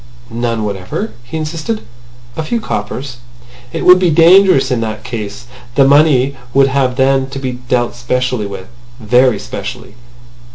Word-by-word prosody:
"None 115 -1 -2
whatever?" 100 - -4
he 160 +7 -6
insisted. 160 +8 -3 0.5
"A - - -3
few 230 +10 -2
coppers." 125 - -5 0.5
"It - - -4
would 180 0 +8
be 180 -2 +2
dangerous 170 -1 +5
in 120 -2 0
that 110 -1 -4
case. 110 -2 -6 0.3
The 135 - +5
money 140 -2 +4 0.2
would 135 0 +5
have 130 -2 0
then 135 0 +2
to 135 - -7
be 130 -1 -3
dealt 125 -1 -2
specially 120 -2 -2
with. 95 -2 -8 0.3
Very 125 +1 +3
specially. 115 +5 -7
130 Hz, 150 wpm, -15 LUFS, 120-145 Hz, 0.5 s, would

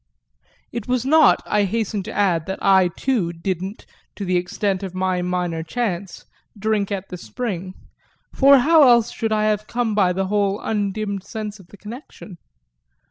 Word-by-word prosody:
It 235 -3 -5
was 250 -1 0
not, 310 +3 +5
I 210 - +1
hasten 215 0 -2
to - - -7
add, 175 -6 +1
that 190 - -3
I 190 -2 +4
too 190 -1 -1
didn't, 185 +4 -5 0.3
to 200 - -5
the 180 0 0
extent 185 +2 -1
of 190 -2 -6
my 185 -1 0
minor 180 -2 -2
chance, 190 0 -4 0.3
drink 210 -1 -1
at 195 -1 -4
the 180 - -6
spring; 190 -3 -5 0.6
for 275 0 +6
how 315 +5 +5
else 235 -2 +4
should 225 -2 -3
I 215 0 +1
have 215 0 0
come 240 -2 -1
by 195 -3 +3
the 190 +2 -1
whole 200 0 0
undimmed 205 -2 -2
sense 215 -1 -6
of 190 - -16
the 205 - -15
connection? 210 - -11
200 Hz, 170 wpm, -21 LUFS, 185-220 Hz, 0.6 s, for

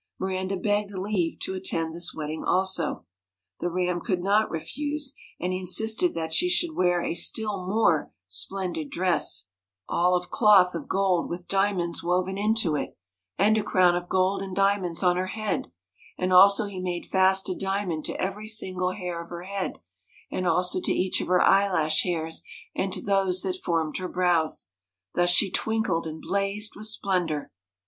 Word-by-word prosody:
Miranda 190 0 -2
begged 205 +2 0
leave 185 -3 -1
to - - -2
attend 165 -4 -2
this 170 +1 -3
wedding 155 0 -5
also. 185 - +1 0.5
The 175 - -1
Ram 180 0 -1
could 185 -6 -1
not 205 +3 +2
refuse, 290 - -4 0.3
and 180 +2 -2
he 185 - -2
insisted 220 - +2
that 160 -1 -3
she 360 - +2
should 345 -2 0
wear 175 -1 +2
a - - -1
still 200 +1 0
more 190 -7 +2
splendid 165 - -3
dress, 180 - +2 0.4
all 180 +1 +2
IS7 - - +4
MIRANDA 180 - 0
of 180 - -25
cloth 200 -5 +5
of 165 -4 -6
gold 190 -3 +1
with 175 +1 -6
diamonds 195 -4 0
woven 180 +2 0
into 210 -5 +1
it, - - -4 0.4
and 215 +3 +3
a - - -2
crown 180 -3 +3
of 175 0 -4
gold 185 +1 +1
and 190 -1 -6
diamonds 195 -3 +1
on 180 -1 +3
her 185 +1 -1
head, 215 +1 -3 0.5
and 185 0 0
also 200 +4 +7
he 200 -2 -7
made 180 -1 -3
fast 190 0 +3
a 185 - -1
diamond 190 -4 -2
to - - -3
every 200 +3 -3
single 185 -4 0
hair 180 -3 -5
of 170 - -17
her 175 0 -7
head, 195 0 -4 0.5
and 185 - -2
also 180 +2 +1
to - - 0
each 185 0 +1
of - - -4
her 180 0 +3
eyelash 180 -6 +3
hairs, 165 -2 -2 0.3
and 190 - -2
to - - -2
those 195 -2 +1
that 185 -2 -2
formed 165 -3 -1
her 185 -1 -4
brows. 170 - +1 0.4
Thus 175 0 +2
she 180 +2 +4
twinkled 220 -7 0
and 160 0 -7
blazed 200 +2 0
with 215 +1 -5
splendour. 180 -8 -1
185 Hz, 180 wpm, -26 LUFS, 175-200 Hz, 0.5 s, also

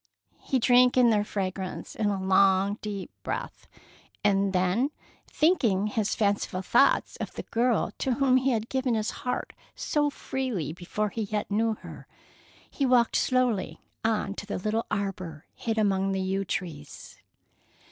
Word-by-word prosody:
He 265 - 0
drank 250 +1 +5
in 245 -2 +6
their 210 -1 +3
fragrance 190 -2 -4
in 215 - -1
a 200 -1 0
long, 190 +1 +3
deep 205 -3 -5
breath, - - -5 0.6
and 200 -1 +3
then, 185 +8 +1 0.4
thinking 235 - +2
his 210 0 -1
fanciful 200 -3 0
thoughts 240 +8 +3
of - - -5
the - - -5
girl 235 -1 +1
to 260 - +1
whom 260 0 +3
he 260 +1 +1
had 225 -3 0
given 260 -2 0
his 215 -1 -1
heart 250 - -4 0.2
so 295 -1 0
freely 245 - -3
before 185 +5 -3
he 225 - -4
yet 210 0 -3
knew 220 +2 +1
her, - - -11 0.6
he 280 - -4
walked 250 -3 +3
slowly 250 -6 +1 0.2
on 220 -3 0
to 205 - -8
the 205 - -3
little 215 +4 -1
arbor 190 -7 -4
hid 225 -2 -3
among 195 -2 +2
the 190 - -1
yew 190 +1 -1
trees. 160 -7 -6
210 Hz, 155 wpm, -27 LUFS, 195-245 Hz, 0.6 s, in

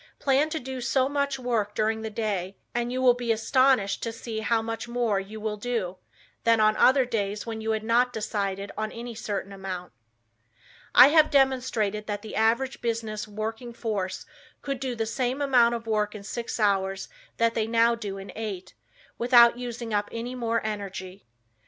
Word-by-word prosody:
Plan 280 +3 +2
to 315 - -2
do 260 -1 -6
so 255 +2 +2
much 280 -1 -1
work 230 -5 -1
during 220 +1 0
the 220 - -4
day 200 -4 -3 0.2
and 240 0 -1
you 255 +1 -1
will 250 -1 +7
be 240 -1 -2
astonished 225 -1 +2
to 230 - -2
see 225 -1 -5
how 225 +1 +1
much 225 +1 -4
more 235 -4 0
you 205 +3 -8
will 215 0 -3
do, 205 -5 -3 0.5
than 230 -1 +4
on 215 0 +4
other 260 0 +5
days, 210 -3 -2
when 225 -1 -5
you 220 - -3
had 220 -1 0
not 240 +2 +3
decided 200 -3 -3
on 215 0 -3
any 235 +1 -7
certain 200 -2 -4
amount. 185 -2 -6 1.0
I 250 +3 +10
have 310 0 +5
demonstrated 250 -7 +1
that 205 0 -3
the 220 - -7
average 235 +4 +1
business 225 -2 -3
working 225 +3 -5
force 205 -5 -3 0.4
could 275 -2 -3
do 255 -2 -3
the 225 -1 -1
same 250 +4 -1
amount 245 -4 +4
of 230 -1 -6
work 215 -1 0
in 205 - -8
six 235 +3 -5
hours 195 -2 +1 0.3
that 230 0 +2
they 220 -1 0
now 230 +1 +4
do 205 -4 -5
in 195 0 -8
eight, 205 -4 -5 0.5
without 240 0 +6
using 240 -2 -5
up 205 0 0
any 235 +2 -4
more 230 -3 -1
energy. 195 - -6
225 Hz, 185 wpm, -26 LUFS, 210-245 Hz, 1.0 s, I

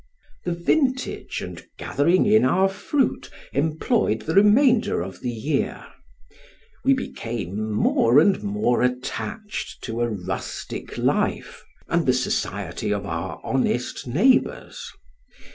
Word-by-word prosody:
The 175 - 0
vintage 255 - 0
and - - -8
gathering 170 +6 +2
in 215 +1 +5
our 185 +9 +4
fruit 245 +8 -1 0.2
employed 155 - +1
the 160 - -2
remainder 220 - +4
of 95 +1 -8
the 125 - -2
year; 135 +5 -2 1.0
we 270 +1 +4
became 110 - -4
more 115 +4 +4
and 190 +5 +3
more 205 -12 0
attached 130 - -3
to 115 -1 -3
a 120 - +1
rustic 95 -3 -5
life, - - -1 0.2
and - - 0
the - - +5
society 105 - -2
of 100 -1 -1
our 85 +1 -4
honest 125 -1 -1
neighbors. 205 - +1
145 Hz, 115 wpm, -23 LUFS, -, 1.0 s, in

